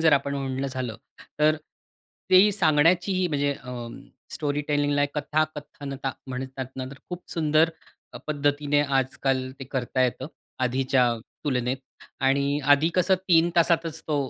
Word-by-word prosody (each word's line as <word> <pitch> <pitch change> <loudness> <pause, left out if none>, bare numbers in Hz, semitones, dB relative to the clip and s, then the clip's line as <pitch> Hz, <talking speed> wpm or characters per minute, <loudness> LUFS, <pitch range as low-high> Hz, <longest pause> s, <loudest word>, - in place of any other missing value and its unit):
जर 160 -1 +5
आपण 140 0 +2
म्हणणं 135 -1 -2
झालं 130 -4 -4 0.4
तर 155 +1 +4 0.7
ते 185 +3 +7
सांगण्याचीही, 175 +1 +3
म्हणजे 145 -1 0
अ, 125 -3 -7 0.5
स्टोरी 145 -1 -1
टेलिंगला 145 -1 +2
कथा-कथनता 145 -2 -3
म्हणतात 130 0 -5
ना, 130 - -3
तर 135 +2 -10
खूप 180 0 -6
सुंदर 155 0 +3 0.4
अ, - - -8
पद्धतीने 145 0 +1 0.2
आजकाल 130 0 -1
ते 135 - -6
करता 130 -1 0
येतं 130 +1 -2 0.4
आधीच्या 130 0 +2 0.4
तुलनेत. 125 -2 0 0.4
आणि 140 +2 +2
आधी 145 +3 +4
कसं 185 +1 +4
3 170 -1 +5
तासातच 165 -1 +2
तो 150 - +1
145 Hz, 130 wpm, -25 LUFS, 130-155 Hz, 0.7 s, ते